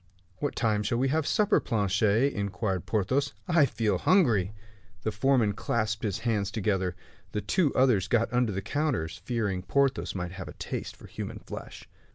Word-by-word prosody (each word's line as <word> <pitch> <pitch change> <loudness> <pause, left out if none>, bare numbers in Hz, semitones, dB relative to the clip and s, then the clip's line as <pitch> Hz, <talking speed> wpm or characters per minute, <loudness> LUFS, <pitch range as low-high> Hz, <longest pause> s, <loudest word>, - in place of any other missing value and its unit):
"What 145 - -2
time 110 -3 +1
shall 110 +3 0
we 130 +2 +2
have 155 +1 +1
supper, 210 -1 +3
Planchet?" 105 +5 +2
inquired 95 -2 -2
Porthos, 115 +8 0
"I 165 -5 +5
feel 115 -3 0
hungry." 115 - +3 0.5
The 110 - 0
foreman 110 -1 +2
clasped 110 0 -1
his 100 -4 -1
hands 105 -4 +1
together. 95 -4 -1 0.4
The 105 - -1
two 165 - +2
others 120 -7 +3
got 120 +1 +1
under 125 -3 +2
the 95 0 -3
counters, 125 - -1
fearing 105 -5 -1
Porthos 135 +6 +1
might 90 -2 -3
have 95 -2 -7
a 75 - -8
taste - - -5
for - - -14
human - - -6
flesh. - - -9
110 Hz, 170 wpm, -28 LUFS, 100-130 Hz, 0.5 s, I